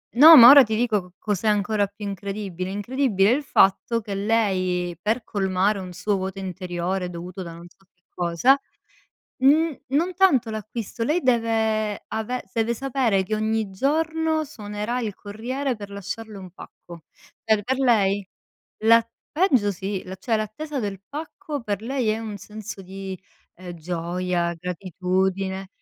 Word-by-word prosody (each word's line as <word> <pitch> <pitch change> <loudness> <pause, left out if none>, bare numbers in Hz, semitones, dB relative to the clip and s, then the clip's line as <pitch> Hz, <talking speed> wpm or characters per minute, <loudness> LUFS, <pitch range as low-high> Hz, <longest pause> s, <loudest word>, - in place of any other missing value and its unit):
no, 310 +6 +10
ma 240 -4 +11
ora 280 0 +10
ti 220 -2 -2
dico 220 -3 +1
co 180 -1 -17
cos'è 210 0 -2
ancora 210 0 +1
più 205 +1 -10
incredibile, 195 -2 -5
incredibile 205 0 +1
il 285 +4 +1
fatto 230 0 +2
che 205 -1 -6
lei, 185 -5 0
per 220 +4 0
colmare 195 +1 0
un 185 -1 -7
suo 195 +3 -1
vuoto 190 0 -4
interiore 180 0 -3
dovuto 180 +2 -7
da 170 -1 -8
non 170 +1 -11
so 195 - -28
che 180 0 -45
cosa, 175 +11 +3 0.8
n 305 +2 +4
non 330 +7 0
tanto 320 -11 +3
l'acquisto, 220 +1 -5
lei 310 +8 +1
deve 220 - 0
ave 245 +3 -3
deve 225 0 +1
sapere 245 -6 0
che 190 +3 -3
ogni 215 -1 -1
giorno 315 +7 0
suonerà 215 -3 -4
il 215 -4 -3
corriere 245 +7 -4
per 205 -1 -9
lasciarle 200 +2 -7
un 185 -1 -10
pacco. 170 -1 -13 0.4
Per 215 -2 +2
per 260 +5 -1
lei, 205 -6 +2 0.6
la 230 0 +6 0.3
peggio 265 - +3
sì, 190 +1 -4
la 190 +1 -8
cioè 225 +3 0
l'attesa 270 +7 -4
del 200 -4 -4
pacco 310 +1 -6
per 205 -1 -3
lei 255 0 -1
è 215 +1 +1
un 215 -2 -6
senso 210 -1 -9
di, 190 0 -7 0.4
ehm, 180 0 -9
gioia, 175 +1 -2
gratitudine. 190 +2 -2
210 Hz, 155 wpm, -24 LUFS, 190-240 Hz, 0.8 s, ma